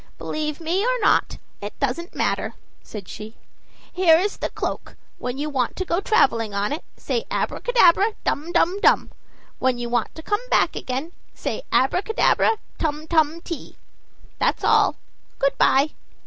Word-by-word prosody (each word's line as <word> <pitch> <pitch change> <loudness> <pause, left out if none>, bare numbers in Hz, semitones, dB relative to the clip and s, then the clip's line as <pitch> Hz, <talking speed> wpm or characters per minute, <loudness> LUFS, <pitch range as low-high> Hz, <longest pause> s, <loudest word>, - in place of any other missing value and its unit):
"Believe 305 -1 -3
me 340 +4 0
or - - +1
not, 415 - +2 0.2
it 205 +1 -7
doesn't 280 +6 -2
matter," - - -1 0.3
said 200 -4 -9
she. 215 +2 -9 0.6
"Here 350 -3 +5
is 395 +4 -1
the - - -2
cloak: - - -5 0.2
when 250 +1 -4
you 295 +2 -2
want 260 -5 -1
to 375 - -3
go 340 0 0
traveling 230 - +2
on 205 +6 0
it, 305 - -5
say 465 - -2
'Abracadabra, 430 -3 +3
dum, 310 +4 -1
dum, 360 +3 +2
dum'; - - +4 0.5
when 255 -1 +1
you 240 0 -4
want 240 -1 -1
to 320 - -9
come 415 +5 0
back - - +3
again, 265 +6 -4 0.2
say - - -3
'Abracadabra, 405 - +2 0.2
tum 305 -1 -2
tum 320 0 +2
ti.' 335 -2 -7 0.6
That's - - +1
all; - - +4 0.4
good 275 - +1
by." 280 +3 +4
310 Hz, 155 wpm, -23 LUFS, 260-365 Hz, 0.6 s, Here